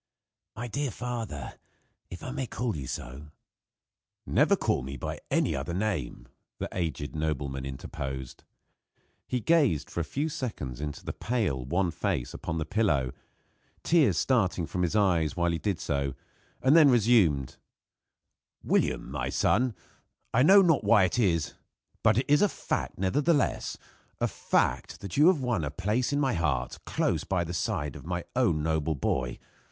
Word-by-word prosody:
"My 120 +3 -5
dear 140 +4 -2
father, 115 - -5 0.5
if 90 - -9
I 130 - -4
may 135 -2 -3
call 120 -2 -2
you 70 -4 -5
so 65 +6 -6 0.5
" - - -64 0.2
"Never - - +4
call - - 0
me 70 +2 -6
by - - -5
any - - +1
other 85 - -3
name," 90 - -2 0.3
the - - -3
aged 80 -4 -3
nobleman 70 -3 -2
interposed. 65 -1 -6 0.8
He 125 - -1
gazed 145 - +2
for - - -3
a - - 0
few 140 - -2
seconds 90 - -5
into 75 -1 -5
the - - -3
pale, 105 - -1
wan 85 +7 0
face 85 - -2
upon 80 - -4
the 80 - -2
pillow, 80 - +1 0.7
tears 145 - +4
starting 95 -9 +1
from 90 - -3
his 90 +3 0
eyes 85 -7 +2
while 85 0 +2
he 85 - -2
did 95 +2 -1
so; 70 -3 -1 0.5
and 135 +4 +5
then 155 -4 +8
resumed: 105 - +3 1.1
"William, - - 0
my - - -2
son, 120 +1 +2 0.6
I 125 - +4
know 195 +7 +8
not 165 -5 +3
why 105 -4 +5
it 95 +6 +1
is, 85 -8 +1 0.5
but - - +4
it 125 - +2
is 145 0 +4
a 205 - +4
fact - - -3
nevertheless, 140 - +1 0.4
a - - +2
fact - - -1
that 100 -3 -6
you 150 +4 +6
have 180 -6 +4
won 120 -9 0
a 75 - -1
place 105 - -1
in 145 - +1
my 135 -3 +2
heart 65 -7 -1
close - - 0
by 90 0 0
the 85 +1 -5
side 75 -4 -2
of - - -9
my 90 -1 -2
own 100 -12 +2
noble 80 0 0
boy. 65 -2 -1
90 Hz, 165 wpm, -28 LUFS, 75-125 Hz, 1.1 s, then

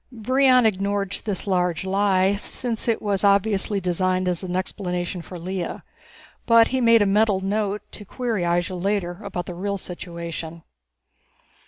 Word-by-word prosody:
Brion 255 +1 +3
ignored 200 -1 0
this 205 -4 -2
large 180 -3 0
lie, 195 0 +2
since 225 +3 -3
it 230 - 0
was 200 -2 0
obviously 200 0 +2
designed 185 0 0
as 180 0 -1
an 180 -1 -3
explanation 180 -1 -3
for 180 +2 -9
Lea. 180 +1 -4 0.6
But 230 -1 +6
he 260 0 0
made 230 -2 +6
a - - +1
mental 205 0 +3
note 205 +1 -1
to 210 - -9
query 230 -1 -2
Ihjel 175 +1 -1
later 195 -3 -1
about 175 -1 -4
the 180 - -6
real 200 +3 -3
situation. 170 -2 -7
195 Hz, 150 wpm, -23 LUFS, 180-210 Hz, 0.6 s, But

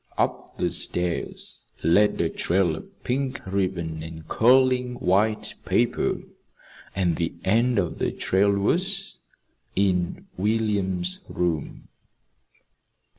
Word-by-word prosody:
Up - - -1
the - - 0
stairs 90 -1 -2 0.2
led 100 +6 +4
a 85 - +2
trail 90 -2 +1
of - - -13
pink 130 +1 -1
ribbon 90 -5 -2
and 80 0 -8
curling 125 +1 +4
white 105 +1 +1
paper - - +1 0.7
and 90 -4 +1
the 85 -1 -2
end 115 +4 +3
of 90 -5 -1
the - - +1
trail 95 +2 +2
was 185 - +1 0.6
in 90 -3 +1
William's 100 -3 0
room. 85 -3 -2
95 Hz, 105 wpm, -25 LUFS, 90-115 Hz, 0.7 s, led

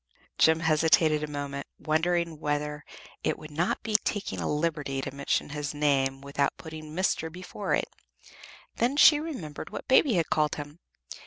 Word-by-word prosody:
Jem 160 0 +5
hesitated 160 -1 +3
a - - -2
moment, 140 -1 -5
wondering 165 0 0
whether 150 0 -2 0.4
it - - 0
would 155 0 -11
not 165 +5 -1
be 215 -1 -3
taking 205 -2 -3
a - - -1
liberty 150 -3 -1
to 135 0 -4
mention 140 +1 -1
his 150 0 -4
name 135 -2 +1
without 140 0 -1
putting 155 -1 -9
"Mr." 170 -3 0
before 185 +3 -3
it: - - 0 0.9
then 250 +5 +1
she 295 0 +8
remembered 250 - -6
what - - -7
Baby 260 0 +5
had 170 -2 0
called 150 -1 +2
him. 145 +2 -8
155 Hz, 160 wpm, -28 LUFS, 145-175 Hz, 0.9 s, she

